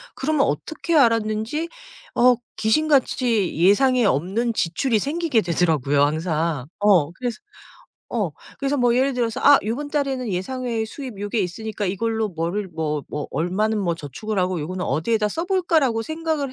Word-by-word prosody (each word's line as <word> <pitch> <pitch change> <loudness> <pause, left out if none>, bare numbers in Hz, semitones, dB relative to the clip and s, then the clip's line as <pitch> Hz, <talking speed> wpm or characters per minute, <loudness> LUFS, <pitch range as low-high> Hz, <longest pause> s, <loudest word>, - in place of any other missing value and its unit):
그러면 295 0 +1
어떻게 315 - -2
알았는지 230 +4 +2 0.5
어 250 +1 +5 0.2
귀신같이 245 - +2
예상에 240 - +4
없는 200 - 0
지출이 220 +6 0
생기게 295 - 0
되더라고요 160 -6 +1
항상. 155 -2 0
어 190 -7 +4
그래서 240 +1 -4 0.7
어 210 -8 -1 0.3
그래서 275 +1 0
뭐 245 -1 +3
예를 270 +2 +2
들어서 235 -3 -1
'아 285 0 +8
요번 265 +7 -3
달에는 275 -4 -1
예상 255 +8 -3
외의 230 -2 -1
수입 245 -3 -8
요게 205 +3 -2
있으니까 210 +3 -3
이걸로 220 +3 -1
뭐를 175 +4 -2
뭐 155 -3 -3
뭐 150 - -5
얼마는 210 +6 0
뭐 175 -4 0
저축을 170 - -5
하고 180 -1 0
요거는 180 +4 -4
어디에다 210 +6 0
써 325 +11 -3
볼까?'라고 330 - +1
생각을 315 -1 -2
220 Hz, 350 characters per minute, -22 LUFS, 180-260 Hz, 0.7 s, 아